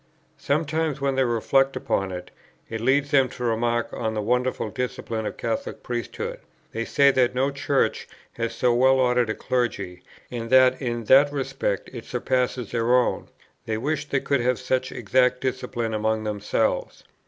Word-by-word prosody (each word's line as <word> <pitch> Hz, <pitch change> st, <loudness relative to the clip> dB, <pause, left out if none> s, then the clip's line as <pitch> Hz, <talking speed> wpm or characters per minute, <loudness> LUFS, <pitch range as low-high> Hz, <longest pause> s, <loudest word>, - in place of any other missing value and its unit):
Sometimes, 155 Hz, 0 st, 0 dB
when 140 Hz, 0 st, 0 dB
they 135 Hz, 0 st, +2 dB
reflect 135 Hz, +3 st, +2 dB
upon 95 Hz, -1 st, -1 dB
it, 90 Hz, -1 st, -7 dB, 0.4 s
it 110 Hz, -1 st, -5 dB
leads 140 Hz, +4 st, +2 dB
them 135 Hz, -3 st, +4 dB
to 125 Hz, -, -8 dB
remark 120 Hz, 0 st, 0 dB
on 110 Hz, 0 st, -2 dB
the 105 Hz, -, -1 dB
wonderful 125 Hz, -1 st, 0 dB
discipline 115 Hz, -3 st, -3 dB
of 105 Hz, -, -4 dB
the -, -, -25 dB
Catholic 115 Hz, -1 st, -3 dB
priesthood; 120 Hz, -1 st, -4 dB, 0.3 s
they 115 Hz, +1 st, -3 dB
say 140 Hz, -1 st, +4 dB
that 125 Hz, -2 st, +2 dB
no 135 Hz, +2 st, +1 dB
Church 140 Hz, 0 st, 0 dB, 0.3 s
has 115 Hz, -1 st, -3 dB
so 125 Hz, +1 st, +2 dB
well 130 Hz, +2 st, +4 dB
ordered 125 Hz, -2 st, +2 dB
a 110 Hz, -, -1 dB
clergy, 100 Hz, -8 st, -2 dB, 0.3 s
and 115 Hz, -2 st, -5 dB
that 130 Hz, 0 st, +5 dB
in 120 Hz, -2 st, -2 dB
that 140 Hz, +6 st, +6 dB
respect 135 Hz, -8 st, -2 dB
it 120 Hz, -3 st, -7 dB
surpasses 125 Hz, -1 st, -1 dB
their 120 Hz, +1 st, +2 dB
own; 125 Hz, -1 st, +1 dB, 0.4 s
they 110 Hz, -1 st, -1 dB
wish 145 Hz, +4 st, -2 dB
they 135 Hz, -, +1 dB
could 140 Hz, -3 st, +1 dB
have 125 Hz, +1 st, +1 dB
such 130 Hz, 0 st, -1 dB
exact 125 Hz, +3 st, +2 dB
discipline 120 Hz, -3 st, -3 dB
among 110 Hz, 0 st, 0 dB
themselves. 105 Hz, -1 st, -1 dB
125 Hz, 170 wpm, -24 LUFS, 115-130 Hz, 0.4 s, that